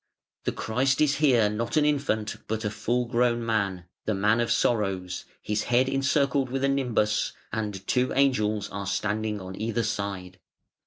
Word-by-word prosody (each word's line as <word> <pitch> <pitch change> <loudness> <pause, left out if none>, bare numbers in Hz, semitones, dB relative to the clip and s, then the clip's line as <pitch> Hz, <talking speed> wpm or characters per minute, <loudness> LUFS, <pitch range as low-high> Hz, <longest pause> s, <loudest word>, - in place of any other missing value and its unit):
The - - +1
Christ 130 +4 0
is 150 -2 +3
here 130 -8 +4
not 115 +7 -2
an 150 - +4
infant 135 -8 0
but 110 0 -2
a 105 - 0
full 120 +3 0
grown 120 -1 +1
man, 100 -6 -1 0.2
the 110 - 0
Man 105 +4 +3
of 120 - 0
Sorrows, 95 -6 0 0.2
His 105 0 -1
head 125 +2 +3
encircled 135 0 +1
with 135 +1 -2
a 140 - +3
nimbus, 120 -6 +1 0.2
and 105 -4 -3
two 125 0 +1
angels 110 -7 +2
are 100 0 -5
standing 105 +2 -1
on 95 0 -7
either 115 +2 -1
side. 100 -4 -4
110 Hz, 165 wpm, -27 LUFS, 105-130 Hz, 0.2 s, here